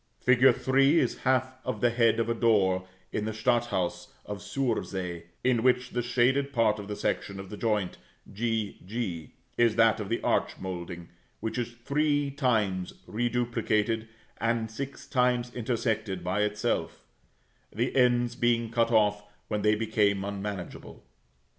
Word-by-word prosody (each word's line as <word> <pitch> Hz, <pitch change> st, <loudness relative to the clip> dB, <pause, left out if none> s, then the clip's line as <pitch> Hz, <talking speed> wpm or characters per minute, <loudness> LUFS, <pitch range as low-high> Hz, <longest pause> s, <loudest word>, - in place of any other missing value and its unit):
Fig. 125 Hz, -1 st, +3 dB
3 135 Hz, +4 st, +3 dB
is 125 Hz, -, +1 dB
half 130 Hz, 0 st, +1 dB
of 125 Hz, -5 st, -3 dB
the 120 Hz, +2 st, +3 dB
head 115 Hz, -1 st, +3 dB
of 115 Hz, -, +1 dB
a 115 Hz, -, +1 dB
door 95 Hz, -5 st, +2 dB, 0.2 s
in 105 Hz, -, -2 dB
the 110 Hz, -, -2 dB
Stadthaus 110 Hz, -6 st, 0 dB, 0.2 s
of 105 Hz, -1 st, -5 dB
Sursee, 100 Hz, -7 st, -3 dB, 0.2 s
in 125 Hz, -2 st, +3 dB
which 125 Hz, 0 st, +2 dB
the 125 Hz, -, -1 dB
shaded 125 Hz, +3 st, +2 dB
part 115 Hz, -4 st, +2 dB
of 100 Hz, -, -7 dB
the 105 Hz, -, -4 dB
section 100 Hz, -1 st, -2 dB
of 95 Hz, +1 st, -9 dB
the -, -, -5 dB
joint 105 Hz, -4 st, -1 dB, 0.3 s
g 110 Hz, -1 st, -2 dB
g, 95 Hz, -7 st, -4 dB, 0.3 s
is 115 Hz, -2 st, +4 dB
that 115 Hz, -1 st, +4 dB
of 105 Hz, -2 st, -5 dB
the 115 Hz, -, 0 dB
arch -, -, +1 dB
moulding, 85 Hz, -2 st, -6 dB, 0.3 s
which 110 Hz, +3 st, -3 dB
is 120 Hz, 0 st, -3 dB
three 145 Hz, -1 st, +1 dB
times 105 Hz, -9 st, 0 dB
reduplicated, 115 Hz, -1 st, 0 dB, 0.3 s
and 115 Hz, -1 st, 0 dB
six 135 Hz, +5 st, -6 dB
times 125 Hz, -2 st, +1 dB
intersected 110 Hz, -5 st, -2 dB
by 95 Hz, +3 st, 0 dB
itself, 105 Hz, 0 st, -1 dB, 0.7 s
the 120 Hz, +5 st, -2 dB
ends 120 Hz, -2 st, +3 dB
being 120 Hz, -2 st, +1 dB
cut 115 Hz, -1 st, +2 dB
off 105 Hz, -2 st, +3 dB, 0.3 s
when 105 Hz, -1 st, -1 dB
they 105 Hz, +1 st, +4 dB
become 105 Hz, -3 st, +1 dB
unmanageable. 100 Hz, -2 st, -6 dB
115 Hz, 150 wpm, -28 LUFS, 105-120 Hz, 0.7 s, is